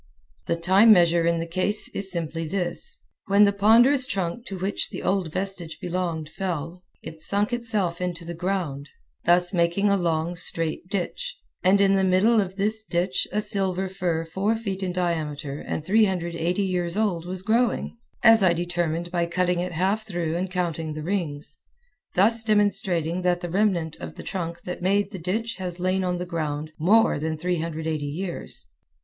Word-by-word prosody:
The 170 - +1
time 190 +6 +5
measure 170 -3 +5
in 170 0 +2
the 165 - -2
case 185 +5 0
is 195 -1 -4
simply 165 -1 -3
this: 175 -1 -2 0.3
When 200 +1 +5
the 200 0 +4
ponderous 240 +7 +5
trunk 195 +4 -3
to 195 - -5
which 190 +2 -1
the - - -7
old 185 -4 0
vestige 185 -3 -3
belonged 175 -3 -3
fell, 175 0 -4 0.2
it 160 0 -8
sunk 205 +6 +1
itself 210 -8 -1
into 175 -2 -3
the 170 - -5
ground, 170 -6 -3 0.4
thus 175 +2 +4
making 175 +4 +2
a 200 - +3
long, 170 -1 -1
straight 165 -1 -2
ditch, 205 - -3 0.2
and 190 +2 +4
in 195 -1 +4
the 190 - +2
middle 200 +5 +4
of 190 -1 -5
this 215 +2 0
ditch 180 -1 0
a 210 0 0
silver 195 -2 +1
fir 180 -4 -2
four 195 +7 0
feet 200 -4 -4
in 185 -2 -1
diameter 155 -5 -2
and 155 - -4
380 180 -3 +1
years 180 -1 -1
old 180 -6 0
was 185 0 -5
growing, 230 +3 +1 0.3
as 225 -2 +7
I 185 -3 +5
determined 175 -1 -2
by 170 -1 0
cutting 180 0 0
it 180 0 -3
half 195 +6 0
through 170 -4 -2
and 185 +2 -2
counting 170 -4 -2
the 155 0 -6
rings, 155 -5 -3 0.6
thus 220 +5 +4
demonstrating 195 -5 +1
that 180 -1 +1
the 175 - -5
remnant 180 -5 +1
of - - -8
the - - -9
trunk 170 -2 -5
that 180 - -6
made 200 +2 +1
the 190 - -6
ditch 220 +7 -2
has 180 -2 -4
lain 185 +1 0
on 180 -1 -1
the 180 - -4
ground 155 -3 -3
more 205 +1 +4
than 160 +1 -2
380 160 -2 -2
years. 170 +5 -3
180 Hz, 175 wpm, -25 LUFS, 170-195 Hz, 0.6 s, as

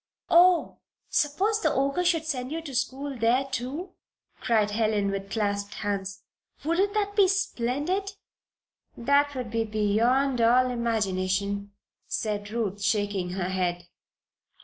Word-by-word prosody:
"Oh, 350 0 +5 0.3
suppose 395 +9 +1
the - - +2
Ogre 275 +6 +1
should 335 -3 +1
send 260 -4 -3
you 325 - -2
to 285 -4 -8
school 265 +3 -2
there, 240 +4 +3
too!" 270 +8 -4 0.5
cried 215 -3 +2
Helen, 210 -2 +1
with 195 0 -4
clasped 200 -1 -2
hands. 195 -1 -3 0.4
"Wouldn't 375 +7 +1
that 410 -1 0
be 400 -2 +6
splendid!" 370 +2 -1 0.8
"That 285 +3 +2
would 250 -4 -4
be 230 0 +1
beyond 230 +5 +1
all 250 +2 +4
imagination," 200 -3 -1 0.3
said 205 -2 -3
Ruth, 210 -3 -3
shaking 200 -4 0
her 185 -1 -2
head. 175 -2 -1
235 Hz, 125 wpm, -27 LUFS, 205-290 Hz, 0.8 s, be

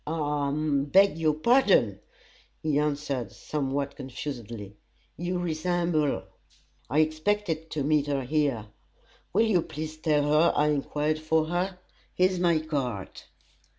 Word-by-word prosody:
"I 150 -2 -1
I - - -2
beg 155 +5 +3
your 155 -2 +2
pardon," 185 - +3 0.6
he 150 -2 +2
answered, 145 -5 -2
somewhat 140 -1 -3
confusedly. 120 -6 -7 0.4
"You 175 +2 -2
resemble 175 -1 0
her; 135 -10 -1 0.7
I 150 +4 +3
expected 160 +1 -1
to 145 - -2
meet 150 0 +2
her 140 -2 -1
here. 140 -5 0 0.7
Will 225 - +3
you 200 -6 +3
please 155 0 -6
tell 155 -2 +2
her 150 +3 +4
I 150 +1 +3
enquired 150 +1 0
for 155 0 +1
her? 180 +3 -2 0.4
Here's 185 0 +2
my 170 -2 +3
card!" 130 -11 -3
155 Hz, 130 wpm, -27 LUFS, 140-165 Hz, 0.7 s, her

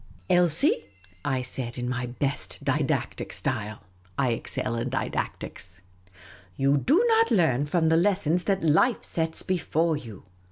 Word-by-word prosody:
" - - -28
Elsie," 175 -2 +3 0.4
I 130 -2 -1
said, 125 -1 -4
in 125 0 -3
my 125 0 -2
best 120 -7 -3
didactic - - -1
style 105 0 -2 0.2
— 90 +1 -31
I 135 -2 +2
excel 115 0 -1
in 115 +2 -2
didactics, 95 -7 -3 0.3
— 90 0 -22
" 90 -1 -25
you 140 +1 +3
do 330 - +3
not 455 0 +4
learn 145 - +2
from 160 +1 +2
the 160 - +4
lessons 180 -2 +2
that 195 -3 0
life 165 - +3
sets 160 -1 -1
before 170 -3 0
you. 115 -9 -9
140 Hz, 160 wpm, -26 LUFS, 120-175 Hz, 0.4 s, not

